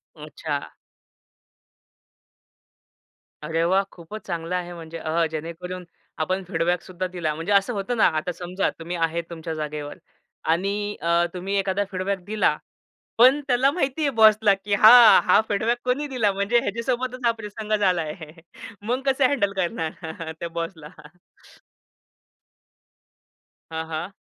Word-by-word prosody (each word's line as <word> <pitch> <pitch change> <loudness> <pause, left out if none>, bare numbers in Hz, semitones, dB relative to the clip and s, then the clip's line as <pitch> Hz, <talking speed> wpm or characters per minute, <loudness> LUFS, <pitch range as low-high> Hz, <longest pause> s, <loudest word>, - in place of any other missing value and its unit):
अच्छा. 150 -1 -5 2.7
अरे 165 +2 0
वाह! 190 +1 +3
खूपच 175 +5 -10
चांगलं 170 0 -3
आहे 175 -1 -4
म्हणजे. 165 -1 -8
अह, 165 +1 0
जेणेकरून 170 +3 -6 0.4
आपण 185 +4 -2
फीडबॅकसुद्धा 180 +1 -1
दिला. 160 -3 -1
म्हणजे 165 +5 -4
असं 200 +4 +3
होतं 210 +4 -2
ना, - - +5
आता 155 +3 -2
समजा 180 +2 -2
तुम्ही 170 +2 -5
आहेत 165 0 -1
तुमच्या 165 -1 -6
जागेवर 150 -1 -5 0.6
आणि 205 +4 -2
अ, 170 +1 +2
तुम्ही 190 +2 -3
एखादा 195 +1 0
फीडबॅक 190 0 -2
दिला. 215 +1 +1 0.6
पण 260 +5 +6
त्याला 255 +2 +4
माहितीये 285 -2 0
बॉसला 215 -3 +5
की 195 +1 -2
हां, 225 +3 +9
हा 185 +3 +6
फीडबॅक 220 +4 0
कोणी 255 +4 0
दिला 230 -7 +1
म्हणजे 200 +5 +1
ह्याच्यासोबतच 245 +4 -2
हा 235 - +5
प्रसंग 210 0 -6
झालाय. 175 -6 +1 0.7
मग 245 +5 -1
कसं 270 0 +3
हँडल 200 -8 +1
करणार 165 -3 -4
त्या 170 - -3
बॉसला? 165 -2 -5 2.8
हां, 160 0 -3
हां. 165 +4 -5
185 Hz, 125 wpm, -24 LUFS, 165-215 Hz, 2.8 s, हां